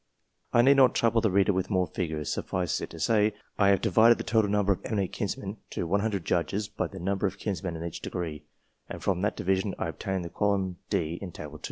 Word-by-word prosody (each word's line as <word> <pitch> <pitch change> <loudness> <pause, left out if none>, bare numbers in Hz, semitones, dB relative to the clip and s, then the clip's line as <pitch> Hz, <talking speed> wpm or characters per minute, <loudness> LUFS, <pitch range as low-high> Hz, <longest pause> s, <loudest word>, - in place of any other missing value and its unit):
I 120 - +5
need 140 +2 +6
not 130 -3 +6
trouble 115 0 +3
the 110 - +2
reader 100 +2 +3
with 95 0 -1
more 95 -3 +2
figures; 80 -5 -3
suffice 90 -2 -2
it - - -5
to 85 - -10
say, 105 +5 +2 0.2
I 100 - +5
have 100 -2 +4
divided 115 +2 +5
the - - -4
total 110 -3 +2
numbers 100 -2 +2
of - - -15
eminent 100 -5 -1
kinsmen - - -4
to - - -3
100 100 0 0
judges 100 +4 0
by - - -3
the - - -11
number 100 +3 0
of 95 +1 -6
kinsmen 95 -4 -3
in 80 - -5
each 85 -1 -6
degree, 80 -4 -4 0.5
and - - -7
from 90 -2 +1
that 105 +2 0
division 95 +1 0
I - - -2
obtained 95 +3 -3
the - - -5
column 95 -1 0
D 85 +1 -1
in 95 -3 -6
Table 75 -2 -8
II. - - -21
95 Hz, 230 wpm, -28 LUFS, 85-105 Hz, 0.5 s, need